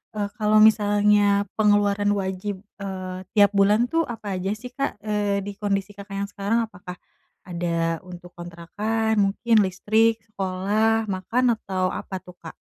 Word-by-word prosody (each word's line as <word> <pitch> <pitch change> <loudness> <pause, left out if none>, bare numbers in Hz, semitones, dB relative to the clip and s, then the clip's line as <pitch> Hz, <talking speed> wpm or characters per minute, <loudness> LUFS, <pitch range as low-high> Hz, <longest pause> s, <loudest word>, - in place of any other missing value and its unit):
eee, 205 -1 -2
kalo 215 -1 +2
misalnya 205 -1 +4
pengeluaran 205 -1 +3
wajib, 190 0 -4 0.2
eee, 185 -2 -5 0.2
tiap 205 -1 +6
bulan 205 +4 +3
tuh 330 0 +2
apa 210 -4 -5
aja 190 +2 -2
sih 245 +3 -10
Kak, 275 -5 -3
eee, 205 -2 -1
di 205 - -5
kondisi 200 -1 -1
Kakak 200 0 -8
yang 200 0 -3
sekarang? 215 +4 0
Apakah 195 -4 -10 0.5
ada 170 -2 -2
untuk 175 0 -11
kontrakan 205 +6 -2
mungkin 215 +3 +3
listrik, 220 +5 +2 0.2
sekolah, 205 +3 0
makan 235 +6 +1
atau 185 -3 -2
apa 190 - -5
tuh 180 - -14
Kak? 165 - -10
205 Hz, 145 wpm, -24 LUFS, 190-215 Hz, 0.5 s, tiap